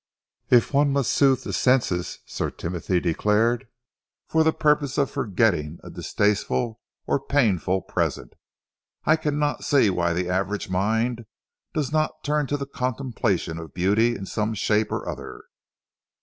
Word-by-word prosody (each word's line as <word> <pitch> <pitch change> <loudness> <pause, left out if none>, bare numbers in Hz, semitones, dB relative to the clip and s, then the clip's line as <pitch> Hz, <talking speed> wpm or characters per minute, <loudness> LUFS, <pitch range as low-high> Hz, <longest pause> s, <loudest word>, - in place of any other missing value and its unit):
"If 125 +2 +4
one 140 0 +4
must 135 -3 +1
soothe 135 -2 +3
the - - -5
senses," 120 -9 +1
Sir - - -3
Timothy 90 +1 -2
declared, 105 +8 +1 0.6
"for 160 0 +3
the 160 - +4
purpose 150 -3 +1
of 140 -2 +1
forgetting 90 -7 0
a - - -9
distasteful 110 +3 0 0.3
or - - +1
painful 95 - +1
present, - - -2 0.7
I 155 - +5
cannot 150 -2 -1
see 135 -8 +4
why 85 -1 0
the 90 +1 -1
average 95 +2 -2
mind 110 +4 0 0.5
does 150 -3 -1
not 155 0 -1
turn 150 -1 0
to 145 - -1
the 140 - -4
contemplation 125 -10 -2
of 80 -4 -10
beauty 105 +6 +2
in 100 - -6
some 110 +2 -2
shape 105 +1 +1
or - - -3
other. - - -7
115 Hz, 145 wpm, -24 LUFS, 95-140 Hz, 0.7 s, I